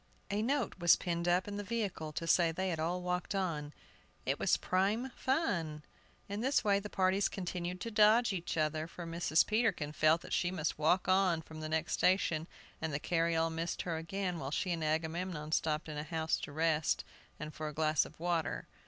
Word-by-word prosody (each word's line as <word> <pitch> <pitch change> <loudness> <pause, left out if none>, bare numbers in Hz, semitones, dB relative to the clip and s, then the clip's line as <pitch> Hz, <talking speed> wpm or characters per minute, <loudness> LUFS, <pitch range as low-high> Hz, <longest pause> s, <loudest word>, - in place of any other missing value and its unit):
A 205 +1 0
note 245 -4 -1
was 175 -1 +6
pinned 170 -1 -2
up 180 +2 +2
in 205 0 -4
the 205 - -3
vehicle 200 -8 -3
to 165 - -3
say 165 0 +4
they 185 +3 -2
had 165 -3 -2
all 175 +3 -1
walked 180 +2 -2
on; 160 -6 -2 0.5
it - - 0
was - - +3
"prime 205 +8 0
fun." 185 - -1 0.4
In 200 +2 -4
this 265 +4 +2
way 200 -2 +3
the 210 +1 -7
parties 190 +1 +2
continued 180 -1 -4
to 230 - -4
dodge 215 +2 +5
each 175 -2 -3
other, 155 0 0
for 175 0 -8
Mrs. 165 -1 +2
Peterkin 215 -9 +1
felt 155 +2 +3
that - - -7
she 175 - +2
must 160 -4 -2
walk 175 +5 +3
on 185 -3 +3
from 160 0 -10
the 155 0 -4
next 160 +1 -1
station, 170 -4 +2 0.3
and 160 -1 -2
the 140 - -1
carryall 165 0 +1
missed 165 +1 -3
her 165 -2 -2
again 180 +2 -3
while 135 - -4
she 180 +5 -1
and 165 -2 -1
Agamemnon 160 0 -2
stopped 155 0 0
in 150 -1 -5
a - - -3
house 160 0 -1
to - - -7
rest, 155 0 +1 0.4
and 150 0 -6
for 155 - -4
a 150 - -5
glass 155 0 +2
of - - -12
water. 170 -3 -1
170 Hz, 205 wpm, -33 LUFS, 160-190 Hz, 0.5 s, was